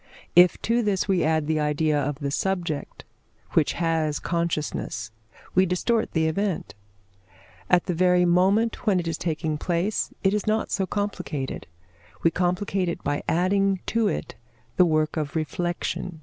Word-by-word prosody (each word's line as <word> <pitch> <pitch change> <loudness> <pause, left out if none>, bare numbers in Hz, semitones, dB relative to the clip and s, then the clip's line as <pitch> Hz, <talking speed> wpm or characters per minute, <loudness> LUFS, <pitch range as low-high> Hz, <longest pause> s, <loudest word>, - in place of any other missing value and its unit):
If 180 +1 +6
to 235 +1 +2
this 205 -4 0
we 190 -3 +2
add 155 -1 +1
the 155 0 0
idea 150 +1 +1
of 145 +1 -2
the 140 0 -3
subject, 175 -3 -2 0.5
which 155 - +2
has 160 -3 0
consciousness, 155 -9 -2 0.4
we 185 +1 +4
distort 220 +6 0
the 160 -1 +2
event. 190 +3 -1 1.0
At 180 -1 +4
the 180 - -1
very 180 +1 +3
moment 195 +7 +2
when 195 -3 +4
it 175 - -3
is 165 -1 -2
taking 155 -2 -2
place, 175 +6 -1
it 195 0 +3
is 210 +1 -1
not 215 +1 0
so 195 -2 0
complicated; 155 - -3 0.6
we 165 - +4
complicate 180 +1 0
it 170 - -5
by 145 0 -1
adding 195 +2 +2
to 225 -1 +3
it - - -3 0.4
the 180 - +5
work 155 -1 +1
of 150 -1 -3
reflection. 175 +2 -3
175 Hz, 155 wpm, -25 LUFS, 155-195 Hz, 1.0 s, If